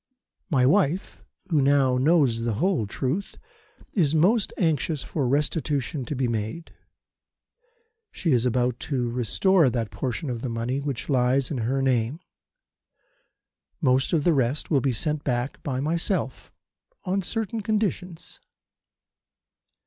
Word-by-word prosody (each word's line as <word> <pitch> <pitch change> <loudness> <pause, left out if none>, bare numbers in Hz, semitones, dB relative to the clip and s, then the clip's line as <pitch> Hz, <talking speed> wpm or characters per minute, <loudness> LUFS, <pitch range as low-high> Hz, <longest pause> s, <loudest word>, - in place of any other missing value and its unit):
"My 130 -6 +3
wife, 175 +3 +1 0.3
who 150 -3 +3
now 135 -2 +3
knows 135 -5 +3
the 115 -2 -1
whole 170 - +1
truth, 135 - -3 0.6
is 160 -6 +2
most 195 +7 +3
anxious 160 -3 0
for 140 -5 -2
restitution 145 -1 -1
to 145 - -4
be 130 -1 0
made. 115 +8 -4 1.4
She 170 - -1
is 120 -3 +3
about 125 0 0
to 125 -5 -1
restore 140 - +3
that 115 -3 -2
portion 130 +2 -3
of 120 -2 -4
the 130 - -3
money 115 +3 -2
which 140 -4 -4
lies 130 0 +2
in 135 - -2
her 130 +4 0
name. 130 +2 +1 1.6
Most 130 +1 +2
of 160 -4 +2
the 175 - +4
rest 135 +3 0
will 140 -4 +3
be 135 - +1
sent 150 +5 -2
back 125 0 -2
by 130 -3 -3
myself, 160 - -2 0.5
on 190 +2 0
certain 225 +3 -2
conditions. 195 -5 -3
140 Hz, 135 wpm, -25 LUFS, 125-165 Hz, 1.6 s, the